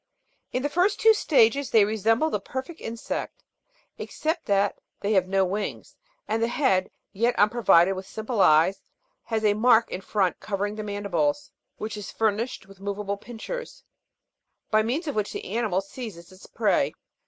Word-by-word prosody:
In 255 - -2
the - - +2
two 290 - -12
first 370 +4 +2
states 275 - +3
they 220 -3 +5
resemble 225 +8 +1
the 210 - 0
perfect 260 - -7
insect, 230 0 -5 0.6
except 320 +2 -3
that 200 0 +1 0.2
they 205 +2 0
have 185 -2 +3
no 195 0 +2
wings, 200 +3 -4 0.3
and 225 - -1
the 230 - +2
head, 235 -7 +1 0.2
yet 235 +5 +1
unpro 230 +4 +2
vided 175 +2 +5
with 190 0 -7
simple 220 0 -2
eyes, 165 +4 +4 0.4
has 220 -1 -1
a 205 - +5
mark 225 +1 +4
in 185 - -4
front 190 -2 0
covering 205 0 -2
the 215 - -5
mandi 205 -1 -5
bles, 290 - 0 0.3
which 215 0 -5
is 205 -2 -7
furnished 220 +1 -1
with 195 0 -16
movable 200 0 -3
pincers, 240 - -7 0.9
by 215 0 +5
means 255 +10 -1
of 290 - -2
which 210 -3 -2
the - - -6
animal 210 -3 0
seizes 195 -4 -9
its 185 +1 -15
prey. - - +1
215 Hz, 170 wpm, -25 LUFS, 195-240 Hz, 0.9 s, they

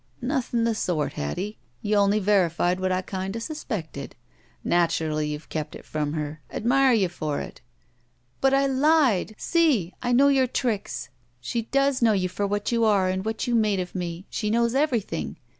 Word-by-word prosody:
"Notiiin' 245 -3 0
the 230 - +2
sort, 175 -8 -1
Hattie. 185 - -4 0.2
You 210 0 +2
only 200 +1 +4
verified 185 -3 +2
what 185 0 0
I 185 0 0
kinda 190 +3 -4
suspected. 215 - -5 0.5
Naturally, 160 -3 +1
youVe 150 +1 -5
kept 155 -2 -4
it - - -11
from 150 -1 -2
her. 155 -1 -4
Admire 260 +3 +3
you 205 -5 +3
for 155 -4 -3
it." - - -8 0.8
"But 270 - +3
I 275 0 +3
lied! 270 - +3
See! 290 - +2
I 245 - -1
know 275 +3 +5
your 265 -2 +3
tricks. 210 - -2 0.3
She 230 - -2
does 275 +3 +1
know 225 -2 +5
you 185 -2 0
for 200 +2 -2
what 205 +2 -1
you 230 -1 +2
are 200 -4 +3
and 190 0 -1
what 220 +3 -2
you 245 - -1
made 215 -4 +2
of 180 -1 -4
me. 175 0 -4
She 210 - -2
knows 235 +1 +2
everything. 250 - -1
205 Hz, 175 wpm, -25 LUFS, 175-245 Hz, 0.8 s, know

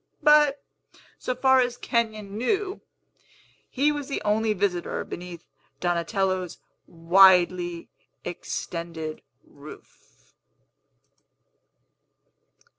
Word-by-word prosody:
But, 295 -2 +5 0.6
so 255 - -3
far 265 0 +4
as 245 -1 0
Kenyon 215 -5 -2
knew, 380 - -1 0.9
he 285 +3 +1
was 290 -2 -4
the 280 - -3
only 215 +1 +1
visitor 185 -3 -2
beneath 175 -1 -9 0.3
Donatello's 180 +1 -1 0.3
widely 175 0 +4 0.4
extended 165 -2 -5 0.2
roof. 65 - -16
190 Hz, 75 wpm, -25 LUFS, 170-250 Hz, 0.9 s, But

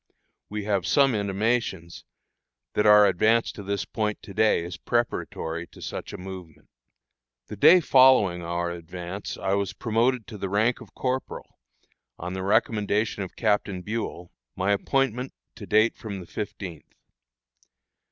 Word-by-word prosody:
We 105 0 -4
have 100 -3 0
some 140 -3 +4
intimations 100 -3 -1 0.7
that 105 - +2
our 105 0 +8
advance 110 +5 +3
to - - -9
this 100 0 -2
point 105 -2 -2
to 100 - -10
day 110 -4 +3
is 85 0 -6
preparatory 85 -6 -2
to - - -17
such - - -6
a - - -7
movement. 90 -5 -10 0.8
The 105 - -6
day 160 - +7
following 130 - +5
our 85 +1 -2
advance 85 +3 -7
I 95 - -1
was 100 -2 -1
promoted 115 +1 0
to 105 - -10
the 95 - -3
rank 110 +5 +1
of - - -14
corporal, 130 0 -4 0.6
on 90 +2 -5
the 95 - -4
recommendation 105 0 +1
of 95 - -6
Captain 100 -3 0
Buel, 105 -4 -5 0.2
my 95 +2 0
appointment 130 +4 0 0.2
to - - -10
date 110 +2 +3
from 100 -3 -7
the 90 - -9
fifteenth. 95 -3 -7
100 Hz, 145 wpm, -26 LUFS, 90-115 Hz, 0.8 s, our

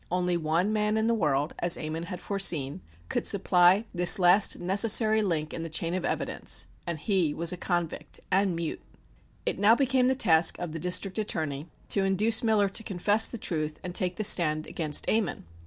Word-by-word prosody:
Only 180 0 0
one 170 +5 -1
man 210 0 0
in 220 - 0
the 230 - +1
world, 150 -7 -1
as 175 0 +3
Ammon 155 +1 -5
had 180 0 -7
foreseen, 160 - -1 0.3
could - - -1
supply 185 +1 +3
this 175 -1 +5
last 185 +2 +4
necessary 215 +4 +3
link 160 -6 -2
in 165 - -5
the 165 - -6
chain 165 +2 -3
of 185 -1 -3
evidence - - -1 0.2
and 170 -2 -3
he 170 -3 -1
was 170 0 +1
a - - -4
convict 175 -2 -3
and 190 -1 +1
mute. 165 -1 -5 0.6
It - - -2
now 210 +3 +5
became 260 -1 +1
the 260 - +1
task 165 -8 +3
of 175 -2 -6
the 165 - -6
District 180 +4 -1
Attorney 155 -6 -3 0.2
to 200 - +1
induce 205 +4 +1
Miller 220 -3 +2
to 200 - -1
confess 205 +2 +1
the 235 - -7
truth 155 -6 -4
and 180 - -6
take 180 0 -1
the 215 - -4
stand 155 -5 +2
against 155 -3 -1
Ammon. 215 - -1
180 Hz, 190 wpm, -27 LUFS, 165-205 Hz, 0.6 s, this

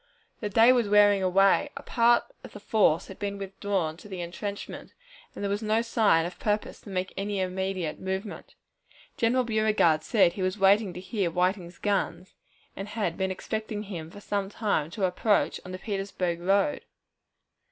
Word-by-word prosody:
The 210 - -3
day 225 +5 +6
was 235 -5 +1
wearing 205 -1 +5
away, 195 +8 +3
a - - -7
part 235 0 +3 0.2
of - - -11
the 205 - -9
force 200 -6 +2
had 190 - -11
been 200 0 -3
withdrawn 195 -4 -2
to 195 - -13
the 190 -2 -6
intrenchment, 200 +4 -6 0.4
and - - -6
there - - 0
was 205 +2 -1
no 220 +1 +1
sign 215 -8 +3
of 175 - -7
purpose 210 0 -2
to - - -12
make 185 -1 -3
any 200 0 -2
immediate 185 -3 -2
movement. 190 +3 -5 0.6
General 245 +3 +2
Beauregard 215 -8 +2
said 170 +2 +3
he 190 - -6
was 185 +2 -1
waiting 200 +1 +4
to 180 - -7
hear 190 -1 -2
Whiting's 180 0 -1
guns, 200 -2 -2 0.4
and 195 - -6
had 205 -5 -2
been 190 -1 -1
expecting 215 +2 -4
him 170 -6 -7
for 205 +4 -12
some 200 -1 -2
time 200 -8 -1
to 190 +3 -1
approach 200 +3 +1
on 185 - -9
the 185 - -5
Petersburg 195 -4 -3
road. 200 +11 +2
195 Hz, 175 wpm, -27 LUFS, 185-210 Hz, 0.6 s, day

